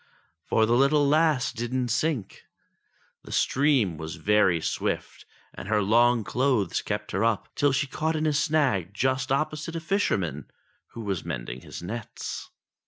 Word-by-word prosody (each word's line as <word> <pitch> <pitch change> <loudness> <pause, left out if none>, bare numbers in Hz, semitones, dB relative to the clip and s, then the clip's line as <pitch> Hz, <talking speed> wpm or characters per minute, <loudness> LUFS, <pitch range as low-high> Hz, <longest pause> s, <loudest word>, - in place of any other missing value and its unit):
For 110 - +3
the 115 - +1
little 140 +3 +4
lass 150 -3 +2
didn't 120 +1 -2
sink. 130 -2 -2 0.8
The - - -12
stream 130 - +2
was 80 +2 -5
very 95 0 +3
swift, - - -3 0.3
and - - -8
her 105 0 +2
long 120 +3 +4
clothes 120 -2 0
kept - - -4
her 95 +3 0
up 115 -2 0
till 145 -1 +2
she 140 +2 +1
caught 160 +3 -2
in 155 0 -1
a 155 - +2
snag 140 - +1
just 130 +2 0
opposite 155 +3 -1
a - - -1
fisherman, 100 - -1 0.5
who - - -4
was 100 -5 -3
mending 65 -6 -5
his - - -9
nets. 110 +4 -6
120 Hz, 155 wpm, -26 LUFS, 100-145 Hz, 0.8 s, little